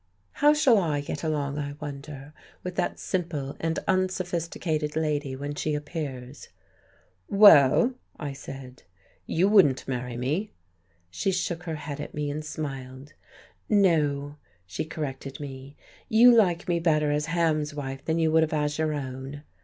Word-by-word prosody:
"How 295 +1 +4
shall 265 -8 +5
I 155 -6 0
get 145 +1 -5
along, 145 -2 -1
I 145 -1 -4
wonder, 145 0 -8 0.3
with 180 - -4
that - - -1
simple 160 -7 -3
and 165 0 -1
unsophisticated 175 -4 -1
lady 150 -4 -1
when 145 +2 -5
she 150 +1 -2
appears?" 145 -3 -6 0.8
"Well," 200 - +7 0.2
I 145 -3 -5
said, 135 -1 -10 0.5
"you 180 +4 +2
wouldn't 185 -11 +4
marry 125 -2 -3
me." 155 - -2 0.6
She 195 - -1
shook 175 -1 -2
her 165 -2 -3
head 150 -1 -6
at - - -8
me, 145 -1 -2
and 155 +2 -4
smiled.... 135 -2 -6 0.6
"No," 150 -8 +2 0.3
she 90 +11 -4
corrected 135 -3 -6
me, 135 -1 -8 0.3
"you 240 +1 +7
like 180 -6 +3
me 170 -1 +1
better 155 -3 +2
as 150 +1 0
Hams' 155 -3 0
wife 135 -1 -5
than 160 0 0
you 160 -1 +2
would 160 0 +5
have 160 0 0
as 150 0 -1
your 155 -1 0
own." 135 +1 -6
150 Hz, 150 wpm, -26 LUFS, 140-170 Hz, 0.8 s, Well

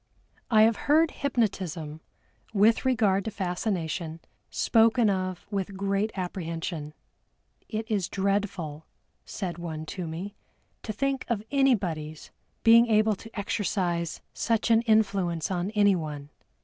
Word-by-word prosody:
I 215 -3 +6
have 225 0 +4
heard 315 +2 +5
hypnotism, 185 - -2 0.5
with 215 +5 +4
regard 215 -7 +2
to - - -1
fascination, 175 -4 -3 0.3
spoken 225 -1 +3
of 185 -2 -3
with 195 -1 -3
great 200 +2 0
apprehension. 165 -4 -4 0.7
"It 220 0 -3
is 200 -6 -1
dreadful," 190 -6 -2 0.4
said 175 -4 -5
one 160 -2 -5
to 180 +1 -5
me, 175 +6 -5 0.5
"to 220 - -4
think 270 +4 -1
of 220 -3 -1
anybody's 180 - 0 0.3
being 230 +1 +7
able 215 -1 +3
to 225 +2 -9
exercise 180 -5 -1
such 230 0 0
an 225 0 +6
influence 195 -6 +2
on 180 +1 -1
anyone." 155 -8 +1
195 Hz, 120 wpm, -27 LUFS, 170-220 Hz, 0.7 s, being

